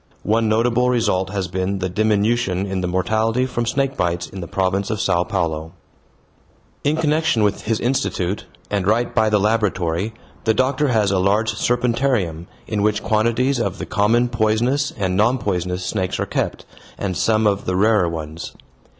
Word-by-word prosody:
One 110 +1 +1
notable 120 +3 +2
result 105 -6 +1
has 95 -2 -2
been 95 +2 -2
the 95 -1 -2
diminution 105 0 +1
in 95 -1 -3
the 90 - -1
mortality 110 +7 +1
from 120 -2 -2
snake 135 +3 0
bites 85 0 0
in 95 - -8
the 85 - -6
province 95 +2 0
of 110 -2 -2
Sao 90 -2 +2
Paulo. 80 -2 -2 1.1
In 145 +2 +2
connection 155 -6 +2
with 100 -1 0
his 110 0 0
institute, 120 -7 -1 0.2
and 100 -2 0
right 115 +3 +1
by 110 -2 +3
the 105 -1 +3
laboratory, 100 -2 0 0.3
the 110 -1 +2
doctor 135 +5 +1
has 110 -6 +2
a 95 - +2
large 105 +4 +2
serpentarium, 115 -8 0 0.2
in 105 -2 -2
which 105 0 +1
quantities 115 +5 +1
of 115 - -2
the - - -5
common 115 +4 +2
poisonous 120 +4 +1
and 95 -3 -1
non 115 +6 +3
poisonous 90 -4 -2
snakes 95 -3 -2
are - - 0
kept, - - -3 0.3
and 95 -3 -3
some 110 +4 +2
of 100 -1 +1
the 90 - -1
rarer 105 -2 +3
ones. 80 0 -6
105 Hz, 170 wpm, -20 LUFS, 95-115 Hz, 1.1 s, by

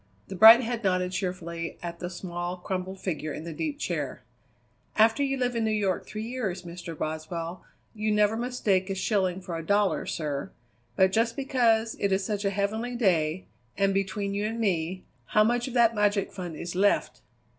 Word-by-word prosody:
The - - -5
bright 225 +5 +10
head 240 -1 -3
nodded 185 -1 +1
cheerfully 170 -3 -4
at 170 -1 -5
the 175 - -4
small, 175 0 -5
crumpled 185 +1 -4
figure 160 -5 -3
in 155 - -6
the 165 -1 -6
deep 290 - -3
chair. - - -3 0.7
"After 225 +5 +4
you 270 -1 0
live 250 -1 0
in 230 - 0
New 220 - +1
York 205 -4 0
three 215 0 -5
years, 210 -8 -3
Mr. 170 -2 -8
Boswell, 165 +3 -4 0.3
you 215 -1 -1
never 210 +1 +3
mistake 225 -6 0
a 195 - -1
shilling 190 -2 0
for 180 -2 -5
a 165 - -4
dollar, 205 +3 +1
sir. 145 -3 -3 0.5
But 190 0 +4
just 230 +3 +1
because 235 -5 +2
it 200 - +1
is 190 0 +1
such 210 -2 -2
a - - +3
heavenly 215 +5 -2
day 180 -6 +1 0.3
and 195 0 +2
between 195 +1 -1
you 205 +1 -1
and 225 +1 -4
me, 185 -3 -1 0.2
how 215 +11 +4
much 240 +3 +1
of 255 - -6
that 235 -1 +5
magic 205 -2 +1
fund 180 -4 -6
is 170 +3 -5
left?" 200 +3 +1
195 Hz, 190 wpm, -27 LUFS, 180-225 Hz, 0.7 s, bright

